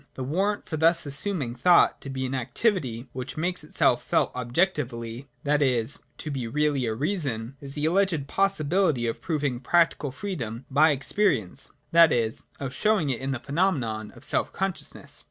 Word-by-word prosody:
The 130 Hz, -, -4 dB
warrant 195 Hz, +10 st, -1 dB
for 155 Hz, -, -4 dB
thus 165 Hz, +2 st, +3 dB
assuming 140 Hz, -2 st, 0 dB
thought 170 Hz, +8 st, +4 dB
to 140 Hz, -, -7 dB
be 130 Hz, -1 st, -3 dB
an 130 Hz, -, -3 dB
activity 130 Hz, -, -1 dB
which 130 Hz, +2 st, -6 dB
makes 175 Hz, +1 st, -1 dB
itself 150 Hz, -, +2 dB
felt -, -, +1 dB
objectively, 125 Hz, -3 st, -1 dB, 0.2 s
that 150 Hz, +1 st, +2 dB
is, 125 Hz, -1 st, +2 dB, 0.2 s
to 155 Hz, -, -5 dB
be 130 Hz, -4 st, -3 dB
really 145 Hz, -1 st, +1 dB
a 110 Hz, -, -1 dB
Reason, 135 Hz, -, -2 dB
is 140 Hz, -1 st, -8 dB
the 150 Hz, +1 st, -2 dB
alleged 175 Hz, -3 st, +2 dB
possibility 175 Hz, -6 st, +1 dB
of 115 Hz, -, -3 dB
proving 145 Hz, -7 st, -1 dB
practical 155 Hz, 0 st, +2 dB
freedom 130 Hz, -, -5 dB
by 150 Hz, +4 st, +5 dB
ex 140 Hz, -1 st, -2 dB
perience, 135 Hz, -, 0 dB, 0.2 s
that 165 Hz, -1 st, +7 dB
is, 115 Hz, -2 st, 0 dB
of 135 Hz, -2 st, -4 dB
showing 200 Hz, -5 st, +1 dB
it 125 Hz, -, -3 dB
in 135 Hz, -, -3 dB
the 130 Hz, -2 st, -2 dB
phenomenon 135 Hz, -, -1 dB
of -, -, -13 dB
self -, -, 0 dB
consciousness. 190 Hz, -1 st, -4 dB
140 Hz, 170 wpm, -26 LUFS, 125-170 Hz, 0.2 s, that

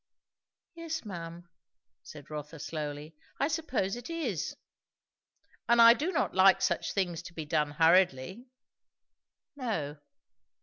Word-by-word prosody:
"Yes, 330 Hz, -4 st, -5 dB
ma'am," 170 Hz, -3 st, -8 dB, 0.5 s
said 150 Hz, -1 st, -12 dB
Rotha 150 Hz, +1 st, -7 dB
slowly, 150 Hz, 0 st, -6 dB, 0.2 s
"I 280 Hz, -, +2 dB
suppose 280 Hz, -, -1 dB
it 240 Hz, +3 st, -9 dB
is." 330 Hz, -1 st, -3 dB, 1.1 s
"And 235 Hz, 0 st, +5 dB
I 230 Hz, 0 st, +10 dB
do 305 Hz, +10 st, -2 dB
not 330 Hz, -, 0 dB
like 190 Hz, 0 st, +6 dB
such -, -, 0 dB
things 175 Hz, -4 st, -1 dB
to 175 Hz, -1 st, -12 dB
be 160 Hz, -, -5 dB
done 150 Hz, 0 st, 0 dB
hurriedly." 170 Hz, -, +2 dB, 1.1 s
"No." 165 Hz, -, -3 dB
180 Hz, 120 wpm, -30 LUFS, 155-240 Hz, 1.1 s, I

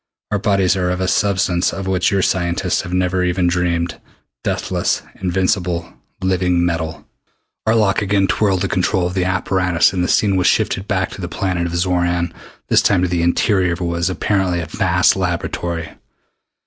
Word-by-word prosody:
Our 105 Hz, -, +1 dB
bodies 100 Hz, -2 st, +2 dB
are 90 Hz, -1 st, 0 dB
of 90 Hz, 0 st, -1 dB
a 95 Hz, -, 0 dB
substance 95 Hz, -3 st, +1 dB
of 95 Hz, +2 st, -5 dB
which 95 Hz, -1 st, +1 dB
your 100 Hz, -1 st, +1 dB
scientists 85 Hz, -2 st, 0 dB
have 90 Hz, -, -8 dB
never 90 Hz, 0 st, +1 dB
even 90 Hz, 0 st, 0 dB
dreamed 85 Hz, -1 st, -1 dB, 0.4 s
deathless, -, -, -1 dB, 0.2 s
invincible, 90 Hz, -2 st, -1 dB, 0.3 s
living 90 Hz, -2 st, +1 dB
metal!" 80 Hz, -2 st, -3 dB, 0.6 s
Arlok 110 Hz, -2 st, +3 dB
again 100 Hz, -1 st, +2 dB
twirled 95 Hz, -2 st, +1 dB
the -, -, +1 dB
control 90 Hz, 0 st, 0 dB
of 90 Hz, -, -2 dB
the 90 Hz, -1 st, 0 dB
apparatus 90 Hz, -1 st, +1 dB
and 90 Hz, -2 st, 0 dB
the -, -, 0 dB
scene 100 Hz, 0 st, +2 dB
was 90 Hz, -, +2 dB
shifted 95 Hz, +2 st, +1 dB
back 95 Hz, -2 st, -1 dB
to -, -, -8 dB
the 90 Hz, -, -4 dB
planet 90 Hz, -1 st, -1 dB
of 85 Hz, -, -4 dB
Xoran, 85 Hz, -1 st, 0 dB, 0.3 s
this -, -, +4 dB
time 95 Hz, -3 st, +2 dB
to -, -, +2 dB
the 85 Hz, -1 st, 0 dB
interior 90 Hz, +1 st, +2 dB
of 85 Hz, -, -6 dB
what 85 Hz, -, -1 dB
was 85 Hz, +1 st, 0 dB
apparently 95 Hz, -2 st, 0 dB
a 85 Hz, -, -3 dB
vast 90 Hz, +3 st, +2 dB
laboratory. 85 Hz, -2 st, -3 dB
90 Hz, 175 wpm, -18 LUFS, 85-95 Hz, 0.6 s, this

